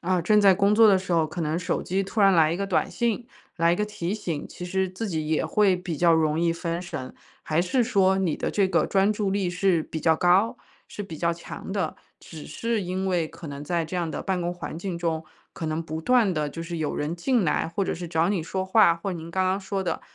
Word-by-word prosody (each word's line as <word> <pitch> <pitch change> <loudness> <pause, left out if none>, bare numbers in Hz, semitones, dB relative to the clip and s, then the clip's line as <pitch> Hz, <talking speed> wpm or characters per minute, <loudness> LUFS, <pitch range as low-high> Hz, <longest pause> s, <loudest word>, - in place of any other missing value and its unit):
啊， 180 +1 +1
正 210 +5 +3
在 200 -2 +7
工 200 +2 +3
作 225 0 +7
的 195 -2 +5
时 185 -1 -8
候， 165 -2 +3
可 165 +3 -6
能 160 +1 -1
手 180 - -2
机 190 +2 -1
突 195 +3 -3
然 195 -1 +7
来 160 -2 +4
一 170 - -1
个 200 - -1
短 190 - 0
信、 235 0 -1 0.3
来 170 0 +3
一 - - +1
个 210 - 0
提 185 -3 -4
醒， 170 -8 -4
其 180 - -8
实 190 +1 0
自 210 +4 -5
己 160 -4 -2
也 155 0 0
会 205 -3 +3
比 180 -2 -4
较 170 +2 +4
容 155 -1 +2
易 170 0 +2
分 170 0 -3
神。 155 -7 -7 0.3
还 160 +2 +1
是 245 +8 +1
说 195 -5 +3
你 180 -5 0
的 - - -2
这 195 -2 +2
个 170 - +2
专 195 +1 +2
注 210 -2 -1
力 195 -2 0
是 180 -2 +1
比 160 - -6
较 160 +1 +4
高、 195 +8 +3 0.3
是 205 - -6
比 165 -6 -8
较 170 0 +1
强 170 +3 -8
的， 190 -6 -1 0.2
只 155 -2 -11
是 230 -2 -2
因 185 +1 -3
为 175 -4 0
可 165 - -11
能 140 0 -7
在 170 +2 -1
这 160 - -7
样 170 -2 -1
的 - - -4
办 190 -2 -1
公 175 0 -2
环 170 -2 -6
境 180 0 -4
中， 165 -2 -1 0.3
可 160 - -5
能 155 +1 -2
不 160 0 -5
断 230 +1 +3
地 150 -3 -1
就 165 +3 -7
是 170 0 -5
有 155 -2 -2
人 150 +3 -2
进 230 +5 +1
来， 160 +1 0
或 195 +4 -1
者 - - -2
是 175 0 -6
找 165 +2 +1
你 185 -6 0
说 190 +3 -3
话， 190 -3 +5
或 185 +3 -4
您 165 -1 -7
刚 190 +2 0
刚 190 +2 0
说 195 0 -3
的， 175 - -2
180 Hz, 280 characters per minute, -25 LUFS, 165-195 Hz, 0.3 s, 在